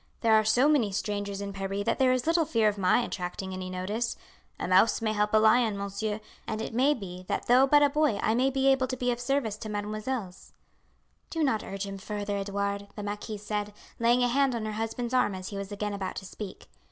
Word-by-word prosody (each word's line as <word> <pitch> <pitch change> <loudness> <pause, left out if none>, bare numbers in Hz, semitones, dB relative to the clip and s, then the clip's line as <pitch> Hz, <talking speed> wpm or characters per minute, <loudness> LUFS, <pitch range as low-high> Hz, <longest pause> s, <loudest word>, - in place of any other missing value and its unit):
There 225 -2 +4
are 215 0 +6
so 245 +6 +4
many 270 -9 +3
strangers 200 0 -3
in 200 0 -5
Paris 195 +1 -3
that - - 0
there 260 -1 +4
is 255 -1 0
little 330 +1 +3
fear 230 -8 +2
of 205 -1 0
my 185 +5 +4
attracting 190 -1 -4
any 185 0 -5
notice. 205 +6 -2 0.4
A - - -2
mouse 190 +5 +4
may 220 -2 0
help 210 0 +1
a 220 - +5
lion, 220 0 +4
monsieur, 200 +2 -3 0.3
and 215 - -3
it 225 - -4
may 270 +5 +3
be 185 -5 -8
that - - -2
though 255 +3 +5
but 290 +1 +6
a 290 - +5
boy 300 -7 +2
I 220 - +2
may 255 +3 +3
be 270 0 0
able 265 -1 +3
to 255 0 -4
be 250 0 0
of 240 - -3
service 245 -4 -1
to 215 - -7
mesdemoiselles." 210 0 -4 0.8
"Do 325 -1 -1
not 225 -7 +1
urge 195 0 -5
him 195 0 -6
further, 205 0 -3
Edouard," 200 0 -2
the 210 - -6
marquise 210 0 -5
said, 210 0 -2 0.3
laying 240 +2 +4
a - - +4
hand 270 +1 +2
on 225 -2 -3
her 215 - -2
husband's 225 +3 -3
arm 250 -6 +2
as 185 0 -6
he 200 - -6
was 200 0 -5
again 205 0 -3
about 195 -2 -4
to 190 - -6
speak. 200 +1 -8
215 Hz, 235 wpm, -28 LUFS, 200-245 Hz, 0.8 s, are